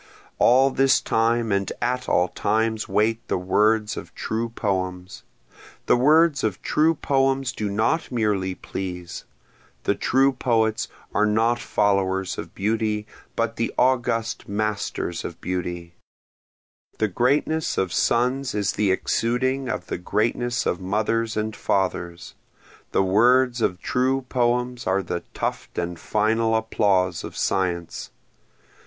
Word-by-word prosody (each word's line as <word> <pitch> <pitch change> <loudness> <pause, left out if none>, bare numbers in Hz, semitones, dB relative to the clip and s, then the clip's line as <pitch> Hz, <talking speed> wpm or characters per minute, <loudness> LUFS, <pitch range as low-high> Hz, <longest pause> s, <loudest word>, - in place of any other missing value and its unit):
All 135 +2 +5
this 135 0 +4
time 115 0 +1
and 100 0 0
at 125 +1 -1
all 90 0 +3
times 110 +4 -1
wait 110 +2 +1
the - - 0
words 105 +4 +2
of - - -9
true 115 +1 -2
poems, 95 -4 -3 0.6
The - - +4
words 150 +4 +4
of 105 -4 -1
true 160 +2 +2
poems 135 -2 +1
do 105 -4 -3
not 110 +12 0
merely 105 -6 0
please, 90 -2 -6 0.6
The - - +2
true 135 +2 +2
poets 115 -4 +1 0.3
are 105 - +3
not 115 +3 +2
followers 95 -4 0
of - - -8
beauty 105 0 -1 0.3
but - - -1
the - - -1
august 120 -4 0
masters 100 -4 -2
of 85 - -7
beauty; 85 -1 -4 1.0
The 110 - +1
greatness 140 - 0
of 95 -1 0
sons 125 +2 +1
is 100 -3 +1
the 105 -2 0
exuding 125 +6 0
of - - -3
the - - -4
greatness 120 +6 -1
of 90 - -1
mothers 110 +4 -1
and 110 0 -2
fathers, 90 -3 -2 0.6
The - - +2
words 120 +5 +3
of 90 -4 0
true 130 +6 0
poems 125 0 0
are 95 +1 +1
the 90 -1 -3 0.2
tuft - - -4
and 85 0 -3
final 110 +1 +1
applause 95 -6 +1
of - - -8
science. 90 -3 -1
110 Hz, 130 wpm, -23 LUFS, 95-125 Hz, 1.0 s, All